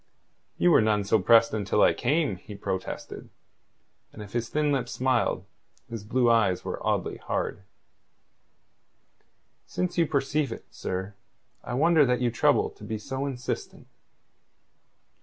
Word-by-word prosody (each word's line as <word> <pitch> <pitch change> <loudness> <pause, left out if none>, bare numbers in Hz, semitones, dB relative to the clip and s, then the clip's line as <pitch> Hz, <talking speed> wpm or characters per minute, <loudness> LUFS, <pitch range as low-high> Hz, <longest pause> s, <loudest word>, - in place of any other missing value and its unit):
"You 175 - +4
were - - +6
none 105 -1 +2
so 105 +2 +2
pressed 115 +3 +5
until 105 -1 +1
I - - +5
came," 145 - 0
he 105 +3 -11
protested, 95 -1 -5 0.8
and 105 - -9
if 100 - -13
his 120 -1 -2
thin 150 -1 +1
lips 125 -4 -1
smiled, 130 0 0 0.5
his 115 -3 -5
blue 120 +3 +1
eyes 115 -6 +2
were - - -5
oddly - - -1
hard. - - -3 2.1
"Since 180 -1 -2
you 165 - +3
perceive 140 +1 0
it, - - -7
sir, 95 +2 -4 0.5
I 120 - -4
wonder 160 +2 +5
that 125 -2 +2
you 120 -1 +1
trouble 120 - +2
to - - -16
be 110 - -4
so 135 +5 -4
insistent." 125 -2 -5
120 Hz, 140 wpm, -27 LUFS, 105-140 Hz, 2.1 s, were